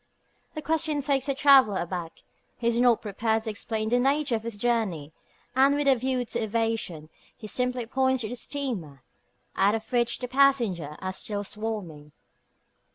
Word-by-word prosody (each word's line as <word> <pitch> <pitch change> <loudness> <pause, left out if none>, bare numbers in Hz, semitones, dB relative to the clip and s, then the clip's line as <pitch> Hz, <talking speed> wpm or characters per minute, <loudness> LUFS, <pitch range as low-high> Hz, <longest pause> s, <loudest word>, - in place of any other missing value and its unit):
The 310 - -5
question 310 -1 0
takes 275 -1 +1
the 275 - 0
traveller 270 -8 +5
aback. 175 -2 -5 0.3
He 235 - -7
is 235 0 +2
not 245 -2 +4
prepared 220 +1 -1
to 220 - -3
explain 220 +1 -3
the 245 +2 +3
nature 275 +1 +1
of 225 - 0
his 230 -1 -5
journey, 205 -10 -1 0.4
and 275 +2 +5
with 290 -1 0
a 275 - +7
view 255 0 -1
to - - -3
evasion 220 -8 -2 0.3
he 220 - -10
simply 250 +2 -1
points 260 +1 +1
to 220 - -2
the 245 - -5
steamer, 220 - -4 0.5
out 205 +2 +3
of 220 0 -7
which 240 -1 +2
the 250 - -5
passengers 235 - +2
are 185 0 -4
still 205 +1 -3
swarming. 195 -9 -5
230 Hz, 170 wpm, -26 LUFS, 205-260 Hz, 0.5 s, a